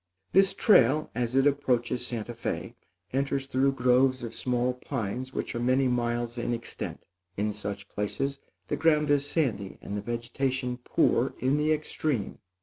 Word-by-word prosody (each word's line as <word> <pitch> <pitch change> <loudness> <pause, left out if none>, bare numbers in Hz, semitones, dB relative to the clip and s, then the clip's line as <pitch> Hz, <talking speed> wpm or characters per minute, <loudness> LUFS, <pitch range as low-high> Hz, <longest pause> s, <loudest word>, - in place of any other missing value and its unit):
This 195 +1 +5
trail, 150 - +4
as 120 +1 -1
it 135 0 +4
approaches 125 -4 +1
Santa 120 0 -4
Fé, 115 - -4 0.4
enters 135 0 0
through 135 +1 +2
groves 130 0 +3
of 115 -1 -5
small 125 0 0
pines 125 0 -4
which - - -3
are 120 - -2
many 130 +2 +3
miles 120 -1 -1
in 120 0 -1
extent. 115 0 -6 0.3
In 105 +1 0
such 100 -1 -5
places 135 +8 -2 0.3
the - - 0
ground 150 -2 +3
is 145 0 +2
sandy 115 - -1
and 100 - -6
the 105 - -2
vegetation 125 +2 -2
poor - - +2
in 130 +3 +1
the 150 +1 +2
extreme. 150 -5 -1
125 Hz, 155 wpm, -28 LUFS, 120-140 Hz, 0.4 s, This